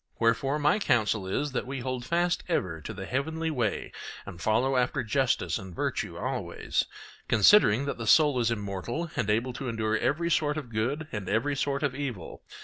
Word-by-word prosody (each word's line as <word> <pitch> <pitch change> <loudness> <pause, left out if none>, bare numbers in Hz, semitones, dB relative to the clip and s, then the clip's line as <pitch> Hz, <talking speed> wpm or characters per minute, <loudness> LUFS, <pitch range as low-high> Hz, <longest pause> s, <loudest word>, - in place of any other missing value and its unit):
Wherefore 115 +5 +2
my 150 +7 +3
counsel 110 - +1
is, 145 +10 -1
that 125 - -2
we 135 -1 -4
hold 130 -1 -3
fast 175 +2 +1
ever 90 - -1
to - - -6
the 95 - -6
heavenly 160 +6 -2
way 120 -8 -1 0.3
and 85 - -9
follow 125 +7 +2
after 125 -1 +1
justice 130 0 +1
and 95 -3 -9
virtue - - -2
always, - - -2 0.4
considering 120 - +5
that 140 - -3
the 115 - -4
soul 145 -2 +5
is 115 -1 +2
immortal 115 - -3
and 120 -5 -1
able 115 +4 +1
to 130 0 -4
endure 110 -1 0
every 170 +9 0
sort 150 -1 +2
of 130 -6 -6
good 135 +9 -1
and 105 -4 -4
every 120 +7 +1
sort 140 +1 -1
of 145 -3 +1
evil. 130 - -5
125 Hz, 185 wpm, -28 LUFS, 110-145 Hz, 0.4 s, considering